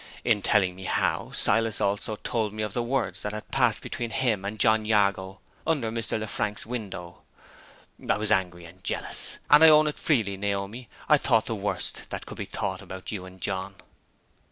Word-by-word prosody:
In 110 -4 +2
telling 95 -3 +2
me 95 0 -8
how, - - 0
Silas 115 0 +2
also 100 +2 0
told 110 -1 -2
me 110 0 -3
of 105 -2 -4
the 120 - 0
words 125 +1 -1
that 105 - -4
had 110 - -7
passed 125 -5 +2
between 120 -1 -4
him 115 -5 0
and 105 +2 -4
John 110 0 +3
Jago 100 -3 +1 0.3
under 135 -9 +1
Mr. 115 -1 -1
Lefrank's 105 -1 -2
window. 100 -7 -6 0.9
I - - +3
was 105 0 -2
angry 90 -4 0
and 90 +3 -15
jealous; - - -2
and 150 +2 +9
I 160 - +10
own 155 0 +7
it 150 - -2
freely, 110 -10 +1
Naomi, 100 +4 -3 0.2
I - - +6
thought - - +3
the - - -2
worst - - -3
that - - -5
could - - -9
be - - -3
thought - - -3
about 95 0 -8
you 95 -4 -5
and 95 0 -14
John." 95 0 -3
105 Hz, 190 wpm, -27 LUFS, 95-115 Hz, 0.9 s, I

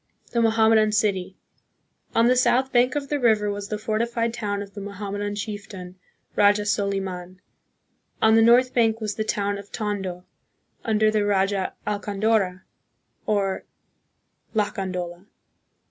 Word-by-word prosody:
The 235 - +1
Mohammedan 220 -1 +4
City. 195 -3 0 0.8
On 230 - +5
the 250 +1 +4
south 255 +1 +2
bank 250 +2 +3
of 280 -2 -3
the 290 - 0
river 215 -4 +3
was 200 0 -5
the 215 - -3
fortified 230 +2 -1
town 205 -4 -3
of 200 -1 -14
the 205 - -7
Mohammedan 205 +1 -4
chief 205 0 -5
tain, 180 -2 -9 0.4
Raja 205 0 +4
Soliman; 190 -3 -2 0.8
on 220 0 +4
the 225 - +6
north 245 +3 +5
bank 225 -2 +2
was 215 -2 -2
the 215 - -2
town 205 -2 -1
of 200 0 -12
Tondo, 195 -4 -4 0.6
under 215 -1 +2
the 215 -1 +1
Raja 195 -1 0
Alcandora, 205 -2 0 0.6
or 200 -2 0 0.9
Lacandola. 185 -3 -3
210 Hz, 135 wpm, -24 LUFS, 200-225 Hz, 0.9 s, the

